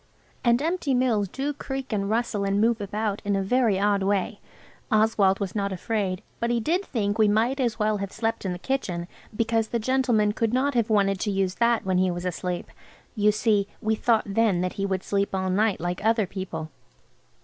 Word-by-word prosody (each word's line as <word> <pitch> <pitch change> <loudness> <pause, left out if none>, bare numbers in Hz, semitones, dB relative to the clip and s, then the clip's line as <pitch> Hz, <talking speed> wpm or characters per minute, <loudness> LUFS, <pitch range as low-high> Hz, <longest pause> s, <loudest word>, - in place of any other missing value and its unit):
And 235 0 +4
empty 325 -5 0
mills 235 -5 +2
do 275 +8 -3
creak 270 -3 -5
and 200 -1 -1
rustle 220 -2 0
and 200 0 +1
move 225 0 +2
about 205 +1 -2
in 205 -1 0
a 195 - 0
very 225 -2 +2
odd 200 0 +2
way. 200 +1 0 0.5
Oswald 215 -3 +3
was 200 -3 -3
not 200 -2 -1
afraid, 190 -1 -2 0.2
but 235 - 0
he 240 0 +1
did 340 - 0
think 210 - -2
we 215 - +5
might 230 +6 +2
as 240 -3 0
well 215 -1 +1
have 200 -1 -4
slept 225 0 -2
in 190 - -2
the 180 - -4
kitchen, 180 -7 -2 0.3
because 225 0 +1
the 235 - -1
gentleman 235 -3 +2
could 225 +1 -1
not 280 +2 +1
have 235 -2 +1
wanted 195 -3 +2
to 210 - -1
use 195 -2 0
that 235 +1 +1
when 185 -1 +1
he 185 0 +3
was 175 0 -4
asleep. 180 0 -3 0.5
You 210 -1 +4
see, 210 -2 +1
we 220 0 0
thought 225 0 +2
then 200 -3 +1
that 185 0 -2
he 195 0 -2
would 190 -1 -2
sleep 200 -1 -1
all 190 0 -1
night 205 +1 +2
like 175 +3 -3
other 220 -1 +3
people. 175 -5 -6
210 Hz, 205 wpm, -25 LUFS, 195-230 Hz, 0.5 s, we